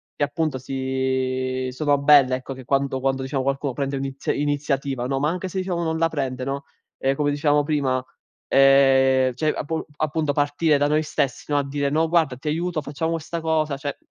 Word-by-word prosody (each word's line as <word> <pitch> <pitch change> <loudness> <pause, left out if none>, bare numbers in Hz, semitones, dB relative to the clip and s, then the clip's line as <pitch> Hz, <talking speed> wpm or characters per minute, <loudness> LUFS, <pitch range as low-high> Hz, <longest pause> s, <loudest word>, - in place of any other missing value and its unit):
che, 145 - -1
appunto, 150 -2 -2
si 130 -1 -2
sono 145 +2 +1
belle, 140 -2 +5
ecco, 130 +1 -6
che 130 -1 -11
quando 135 0 0
quando, 135 0 -1
diciamo, 135 0 -2
qualcuno 135 0 -1
prende 140 0 -2
l'ini 135 0 -4 0.3
iniziativa, 140 -3 -1
no, 135 0 -1
ma 150 - +1
anche 180 +3 -3
se, 185 - -6
diciamo, 185 -2 -1
non 160 -1 -1
la 165 0 +3
prende, 135 -5 -3
no, 140 +1 -4 0.3
ehm, 135 +1 +1
come 145 0 +1
dicevamo 145 0 +2
prima, 140 -4 0 0.4
ehm, 135 -1 +5
cioè, 155 +4 0
appu 160 +2 -3
appunto, 155 0 0
partire 145 +1 +2
da 145 +1 +2
noi 150 +1 +2
stessi, 140 -4 -2
no, 145 - +3
a 145 - +2
dire: 140 0 -1
“No, 160 +3 +1
guarda, 160 -6 +2
ti 145 +4 -9
aiuto, 165 0 -1
facciamo 150 +3 -3
questa 165 +1 -4
cosa”, 155 -2 0
cioè, 145 0 -5
140 Hz, 195 wpm, -23 LUFS, 135-155 Hz, 0.4 s, belle